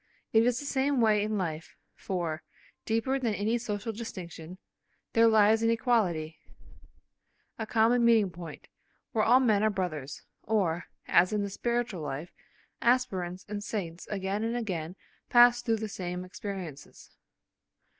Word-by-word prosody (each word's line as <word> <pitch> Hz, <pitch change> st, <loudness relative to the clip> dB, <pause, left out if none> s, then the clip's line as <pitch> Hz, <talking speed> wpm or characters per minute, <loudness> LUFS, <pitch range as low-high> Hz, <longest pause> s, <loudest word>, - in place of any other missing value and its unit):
It 225 Hz, +1 st, +5 dB
is 245 Hz, 0 st, +1 dB
the 285 Hz, -, -7 dB
same 275 Hz, -1 st, +1 dB
way 215 Hz, -3 st, +4 dB
in 215 Hz, +1 st, -1 dB
life, 160 Hz, -4 st, -4 dB, 0.2 s
for, 170 Hz, -4 st, -3 dB, 0.4 s
deeper 230 Hz, +5 st, 0 dB
than 230 Hz, -5 st, 0 dB
any 220 Hz, +4 st, 0 dB
social 215 Hz, -1 st, -4 dB
distinction, 180 Hz, -6 st, -8 dB, 0.6 s
there 230 Hz, 0 st, +6 dB
lies 220 Hz, 0 st, +5 dB
an 230 Hz, -, +3 dB
equality, 205 Hz, -10 st, +1 dB, 1.2 s
a 220 Hz, -, -3 dB
common 235 Hz, +2 st, +3 dB
meeting 225 Hz, -5 st, +4 dB
point, 170 Hz, -3 st, -10 dB, 0.4 s
where 215 Hz, -, +1 dB
all 245 Hz, +4 st, +6 dB
men 220 Hz, -6 st, +3 dB
are 215 Hz, -, +3 dB
brothers, 165 Hz, -9 st, -4 dB, 0.2 s
or, 180 Hz, -6 st, 0 dB, 0.2 s
as 180 Hz, +3 st, +4 dB
in 210 Hz, -1 st, +1 dB
the 200 Hz, -, -4 dB
spiritual 235 Hz, -4 st, -2 dB
life, 150 Hz, +3 st, -5 dB, 0.5 s
aspirants 195 Hz, -8 st, 0 dB
and 205 Hz, 0 st, -5 dB
saints 180 Hz, -6 st, -5 dB
again 195 Hz, +1 st, -2 dB
and 230 Hz, +2 st, -1 dB
again 180 Hz, -7 st, -4 dB, 0.3 s
pass 240 Hz, 0 st, +6 dB
through 225 Hz, -2 st, 0 dB
the 220 Hz, 0 st, -4 dB
same 180 Hz, -2 st, -5 dB
experiences. 185 Hz, -6 st, -8 dB
210 Hz, 145 wpm, -29 LUFS, 180-230 Hz, 1.2 s, there